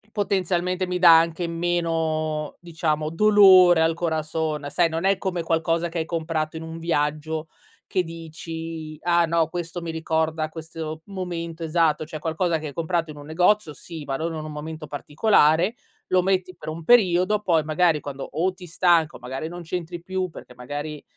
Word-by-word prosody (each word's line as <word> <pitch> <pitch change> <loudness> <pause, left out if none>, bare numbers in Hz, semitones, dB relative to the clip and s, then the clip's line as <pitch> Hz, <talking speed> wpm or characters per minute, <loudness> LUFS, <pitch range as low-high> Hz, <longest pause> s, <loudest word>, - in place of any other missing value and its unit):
potenzialmente 185 -2 0
mi 180 0 -1
dà 170 -2 +8
anche 165 +1 -1
meno, 165 -3 -1
diciamo, 155 -3 -2
dolore 185 -3 +7
al 165 0 +2
corazón, 160 -2 -2
sai, 170 +2 +2
non 165 +3 -3
è 195 -1 +3
come 180 -4 -2
qualcosa 165 +1 0
che 165 - -5
hai 160 - 0
comprato 160 -1 -2
in 160 - -6
un 165 0 -7
viaggio 155 0 -1 0.4
che 185 - 0
dici: 165 -1 -7
"Ah, 170 -1 +3
no, 165 -1 +2
questo 175 0 -5
mi 165 -1 -5
ricorda 160 -1 -1
questo 160 0 -7
momento 170 -4 -5
esatto." 160 -1 +1
Cioè, 155 0 -7
qualcosa 165 +1 0
che 155 -1 -6
hai - - -8
comprato 165 +1 -1
in 150 - -13
un 145 - -11
negozio, 180 +2 +2
sì, 155 +2 -9
ma 135 - -2
non 165 +3 -3
in 155 - -5
un 155 - -6
momento 155 +1 -7
particolare. 160 +5 +2 0.3
Lo 185 0 +3
metti 185 -1 0
per 165 - -10
un 165 +1 -7
periodo 195 -1 +4
poi, 165 -6 +2
magari, 160 0 +2
quando 140 -1 -6
o 175 +5 0
ti 185 -1 -12
stanca, 170 -2 +2
o, - - -14
magari, 130 +5 -5
non 175 +1 -7
c'entri 170 0 -5
più 185 0 -2
perché, 125 -6 -12
magari 145 +4 -6
165 Hz, 180 wpm, -24 LUFS, 155-175 Hz, 0.4 s, dà